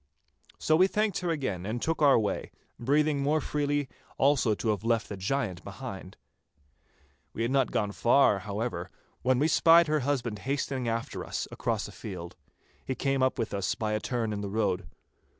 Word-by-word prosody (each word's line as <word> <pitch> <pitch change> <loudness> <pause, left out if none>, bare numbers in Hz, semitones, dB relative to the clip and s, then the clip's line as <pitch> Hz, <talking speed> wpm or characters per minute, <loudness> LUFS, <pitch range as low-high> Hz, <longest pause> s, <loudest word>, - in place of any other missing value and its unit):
So 155 - +2
we 185 +4 +5
thanked 210 0 0
her 180 - -2
again 130 - -2
and 110 +5 -3
took 160 +4 -1
our 140 -2 +6
way, 105 -3 -1 0.3
breathing 145 +3 +2
more 150 +3 +2
freely 145 -1 -1 0.3
also 135 -6 +3
to 110 - -2
have 105 -1 0
left 115 -1 +1
the 100 - -4
giant 95 -2 -2
behind. 100 -3 -8 1.2
We 115 - -2
had 120 - 0
not 135 -4 +2
gone 105 -2 -1
far, 120 -1 +4
however, 100 -2 -4 0.3
when 130 0 +2
we 145 +4 +3
spied 165 +1 +6
her 155 0 +1
husband 125 -6 -1
hastening 135 +1 -2
after 115 0 -3
us - - -4
across - - -2
a - - -10
field. 85 +1 -8 0.5
He 130 - -3
came 135 +1 0
up 130 0 +2
with 115 -4 -2
us 100 -1 -1
by 110 -1 -2
a 105 - +1
turn 115 -1 -2
in 100 - -3
the 100 - -4
road. 105 -3 0
125 Hz, 185 wpm, -29 LUFS, 105-145 Hz, 1.2 s, our